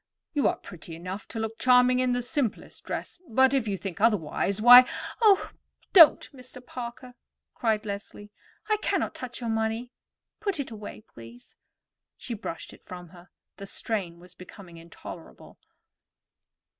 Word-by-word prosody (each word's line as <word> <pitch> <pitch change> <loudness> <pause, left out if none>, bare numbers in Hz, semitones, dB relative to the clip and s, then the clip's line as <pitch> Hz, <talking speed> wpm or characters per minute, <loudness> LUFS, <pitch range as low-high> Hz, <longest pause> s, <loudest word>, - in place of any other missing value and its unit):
You 290 -2 +2
are - - +1
pretty 165 -2 -11
enough 185 +4 -7
to - - -8
look 220 0 -4
charming 250 0 +5
in 255 -1 +1
the 245 0 -1
simplest 255 -3 -3
dress; - - -5
but 265 +3 +3
if 260 -5 +1
you 200 -2 -2
think 190 -1 -7
otherwise, 200 -2 +1
why——" 245 +3 +10 0.3
"Oh, 410 -3 +4 0.4
don't, 330 -6 +8
Mr. 255 -1 -12
Parker," 245 0 -8 0.4
cried 220 -2 -1
Leslie. 205 0 -7 0.4
"I 430 -1 +2
cannot - - -1
touch 250 -1 -7
your 230 -1 -2
money; 225 +2 -2 0.5
put 400 -6 -2
it 275 - -4
away, 215 -1 -9
please." 115 +1 -14 0.6
She 245 - -6
pushed 205 -6 -7
it - - -18
from 180 -2 -9
her. 175 +1 -16 0.3
The 200 - -8
strain 190 -6 -4
was 180 0 -14
becoming 180 -1 -13
intolerable. 165 - -12
225 Hz, 150 wpm, -27 LUFS, 185-250 Hz, 0.6 s, why